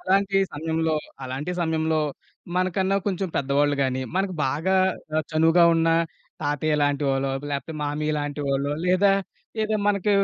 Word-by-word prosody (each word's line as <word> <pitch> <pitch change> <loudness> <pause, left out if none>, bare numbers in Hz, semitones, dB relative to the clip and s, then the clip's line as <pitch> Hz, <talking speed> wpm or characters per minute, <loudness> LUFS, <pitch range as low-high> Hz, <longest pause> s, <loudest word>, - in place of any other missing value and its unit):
అలాంటి 195 +1 +2 0.2
సమయంలో, 160 +1 -1 0.3
అలాంటి 135 +7 -4
సమయంలో, 160 -1 +1 0.6
మనకన్నా 185 +2 +1
కొంచెం 190 -1 -1
పెద్దవాళ్ళు 140 +1 +2
గాని, 130 -1 0
మనకు 190 -1 0
బాగా 160 +8 +1 0.4
అ, - - +2 0.2
చనువుగా 165 +2 +5
ఉన్న 165 0 +2 0.5
తాతయ్య 145 +1 0
లాంటి 145 0 +1
వాళ్ళో, 135 0 0 0.2
లేపోతే 145 +3 -3
మామయ్య 150 +1 -1
లాంటి 145 0 -3
వాళ్ళో, 140 +1 0
లేదా 185 +2 +4 0.5
ఏదా 215 0 0
మనకీ 205 0 +2
160 Hz, 135 wpm, -24 LUFS, 145-185 Hz, 0.6 s, చనువుగా